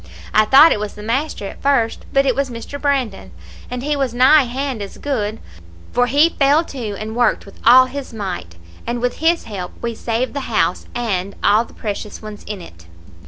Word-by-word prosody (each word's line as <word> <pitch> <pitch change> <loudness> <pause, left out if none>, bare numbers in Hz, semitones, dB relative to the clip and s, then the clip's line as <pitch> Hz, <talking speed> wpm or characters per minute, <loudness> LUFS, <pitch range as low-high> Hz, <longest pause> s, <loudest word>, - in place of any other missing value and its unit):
I 215 - +5
thought 275 +8 +7
it - - +1
was 210 0 -5
the 210 - -9
master 245 0 -2
at - - -10
first, 260 -5 +1
but 275 0 +3
it 260 - +3
was 275 0 -1
Mr. 240 +4 -7
Brandon, 255 - -1 0.4
and 250 0 -5
he 295 +1 0
was 270 -4 -1
nigh 265 +3 +6
hand 260 -1 -3
as 200 - -7
good, 220 -6 -2 0.5
for 245 0 +2
he 290 +6 +4
fell 285 +3 +4
to, 235 -10 -6
and 220 +2 -6
worked 240 -2 +1
with 200 - -15
all 255 +3 +8
his 265 +1 -7
might, 185 - -5 0.3
and 240 +1 -2
with 245 +1 -1
his 335 +1 +2
help 190 -5 -6
we 235 -1 -3
saved 230 +3 -2
the 285 - -2
house, - - 0
and 200 -5 -2
all 215 +3 +4
the - - -18
precious 210 0 -5
ones 215 -1 -9
in 205 -3 -6
it. 85 - -15
240 Hz, 205 wpm, -19 LUFS, 210-275 Hz, 0.5 s, all